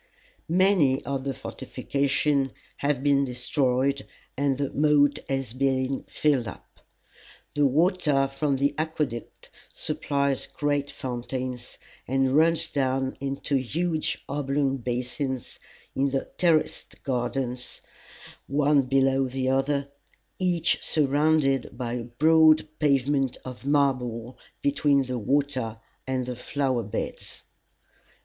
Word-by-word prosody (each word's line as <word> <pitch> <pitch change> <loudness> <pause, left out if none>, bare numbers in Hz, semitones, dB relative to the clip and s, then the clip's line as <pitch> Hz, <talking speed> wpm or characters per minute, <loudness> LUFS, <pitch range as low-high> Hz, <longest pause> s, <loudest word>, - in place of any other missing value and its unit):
Many 175 -7 +3
of 135 -1 -3
the 135 - -1
fortifications 140 0 -1 0.2
have 140 -2 0
been 140 -1 +4
destroyed, 130 +1 0 0.3
and 140 -1 +1
the 140 -1 -2
moat 145 -1 +4
has 135 -4 -2
been 130 0 0
filled 140 -7 +1
up. 90 - -11 0.7
The 145 -1 +3
water 150 -2 +2
from 135 +1 -1
the 140 +2 +1
aqueduct 150 -7 -4 0.2
supplies 140 -2 -1
great 145 -1 -1
fountains, 125 -1 -5 0.3
and 135 +1 +2
runs 165 +1 +4
down 130 -1 0
into 140 0 -1
huge 155 +5 -1
oblong 140 -1 0
basins 125 +2 -3 0.4
in 140 +1 +2
the 135 0 -1
terraced 165 -3 0
gardens, 125 -1 -2 0.7
one 145 +1 +3
below 135 0 +3
the 130 0 -1
other, 140 +1 0 0.5
each 180 -3 +2
surrounded 145 -2 +2
by 120 -2 -3
a 120 -1 -3
broad 155 +5 +5
pavement 140 -2 +2
of 130 +1 -8
marble 130 -4 0 0.2
between 140 -1 +3
the 125 -1 -3
water 130 -2 0 0.3
and 130 -1 -1
the 125 0 -4
flower 130 0 -1
beds. 110 +1 -5
135 Hz, 110 wpm, -26 LUFS, 130-145 Hz, 0.7 s, broad